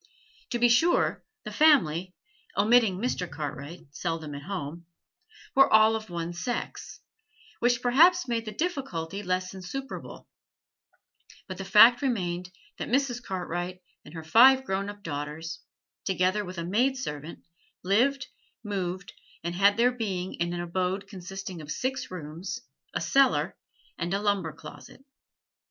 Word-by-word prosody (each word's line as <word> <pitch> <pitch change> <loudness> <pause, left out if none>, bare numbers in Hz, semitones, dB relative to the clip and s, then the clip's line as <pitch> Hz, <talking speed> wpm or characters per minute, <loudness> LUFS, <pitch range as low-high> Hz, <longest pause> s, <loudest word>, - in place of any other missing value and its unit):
To 240 - -1
be 240 0 +5
sure, 280 +9 +3 0.2
the - - -6
family 185 - +3 0.4
omitting 215 -2 +4
Mr. 190 -5 -2
Cartwright, 150 +2 -6
seldom 160 -1 -4
at 140 - -6
home 170 -2 -6 0.7
were 270 +1 +5
all 220 0 +6
of 220 -2 -6
one 170 0 -4
sex, 210 +8 -5 0.6
which 245 0 +2
perhaps 335 +9 +5
made 230 -1 -1
the 215 - -5
difficulty 210 - -3
less 185 -1 -2
insuperable; 230 +9 -7 1.2
but 185 -1 -7
the 195 - -4
fact 225 +5 +7
remained 180 -9 -1 0.3
that - - -4
Mrs. 250 -1 +1
Cartwright 180 -2 -4 0.2
and 160 - -13
her 160 - -6
five 260 +10 +6
grown 195 -1 -2
up 205 0 -10
daughters, 150 +1 -5 0.4
together 190 +2 +1
with 185 -1 -8
a 170 - -3
maid 245 +9 +1
servant, 150 - -6 0.4
lived, 250 +8 +2 0.4
moved, 190 -2 -4 0.3
and 170 +1 -3
had 200 +3 +4
their 245 +2 +4
being 195 -7 -3
in 170 0 -2
an 175 0 -3
abode 185 +3 -2
consisting 190 -2 -7
of 150 - -11
six 260 +10 -2
rooms, 170 0 -6 0.3
a - - 0
cellar, 275 -1 +3 0.4
and 170 0 -2
a - - 0
lumber 200 -5 0
closet. 145 - -13
190 Hz, 140 wpm, -27 LUFS, 175-240 Hz, 1.2 s, fact